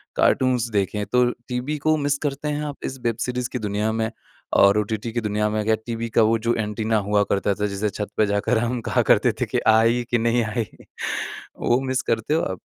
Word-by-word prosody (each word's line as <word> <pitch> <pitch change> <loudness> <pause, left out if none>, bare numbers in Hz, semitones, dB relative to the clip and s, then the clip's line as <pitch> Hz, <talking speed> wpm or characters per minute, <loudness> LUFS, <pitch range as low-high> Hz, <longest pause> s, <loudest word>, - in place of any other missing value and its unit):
Cartoons 125 -2 +2
देखे 100 -1 0
हैं, 105 - -2
तो 125 0 +4 0.2
टीवी 125 +4 -2
को 155 - +5
मिस 145 -1 0
करते 140 +1 -4
हैं 150 0 -1
आप? 145 -1 -5
इस 135 - -4
वेब 115 -2 0
सीरीज़ 125 -1 -2
की 125 - -4
दुनिया 105 0 -1
में? 110 0 -1 0.4
और 100 +1 +6
ओटीटी 110 +2 -3
की 120 +1 -2
दुनिया 105 0 0
में? 105 0 -1
क्या 110 0 +3
टीवी 115 -1 -3
का - - +8
वो 115 - +3
जो 120 - +4
एंटीना 110 +1 -1
हुआ 105 0 +4
करता 100 0 +1
था 105 +1 -1
जिसे 100 +1 -1
छत 105 0 -5
पे 110 - +4
जाकर 100 +3 +1
हम 120 +1 -1
कहा - - +1
करते - - +4
थे - - +3
कि - - -1
आई 115 +2 +4
कि 120 - +4
नहीं 115 +1 +2
आई। 110 +1 -2 1.0
वो 120 +2 +2
मिस 130 0 0
करते 115 +6 0
हो 160 - +2
आप? 95 -2 -3
115 Hz, 225 wpm, -23 LUFS, 105-125 Hz, 1.0 s, का